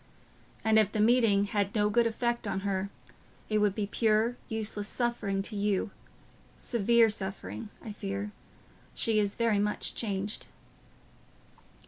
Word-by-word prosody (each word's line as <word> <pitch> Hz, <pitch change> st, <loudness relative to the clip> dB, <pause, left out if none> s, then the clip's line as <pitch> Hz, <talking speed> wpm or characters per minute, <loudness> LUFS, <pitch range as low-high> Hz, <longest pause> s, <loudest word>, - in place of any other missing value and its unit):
And 220 Hz, 0 st, +5 dB
if 210 Hz, -2 st, +3 dB
the 215 Hz, -, -2 dB
meeting 220 Hz, -3 st, +4 dB
had 205 Hz, 0 st, -1 dB
no 210 Hz, -1 st, +3 dB
good 235 Hz, +2 st, +4 dB
effect 235 Hz, 0 st, -1 dB
on 195 Hz, -1 st, -2 dB
her, 195 Hz, 0 st, -1 dB, 0.6 s
it 215 Hz, -1 st, +2 dB
would 205 Hz, -2 st, +2 dB
be 210 Hz, -, -1 dB
pure, 220 Hz, +3 st, +2 dB
useless 215 Hz, -2 st, -2 dB
suffering 215 Hz, -6 st, -1 dB
to 210 Hz, -, -5 dB
you—severe 210 Hz, +3 st, 0 dB
suffering, 190 Hz, -, -5 dB, 0.2 s
I 220 Hz, -, -5 dB
fear. 200 Hz, 0 st, -4 dB, 0.6 s
She 220 Hz, -2 st, +2 dB
is 205 Hz, -1 st, 0 dB
very 230 Hz, -3 st, +2 dB
much 210 Hz, +1 st, 0 dB
changed..." 205 Hz, -2 st, -2 dB
210 Hz, 130 wpm, -30 LUFS, 200-225 Hz, 0.6 s, And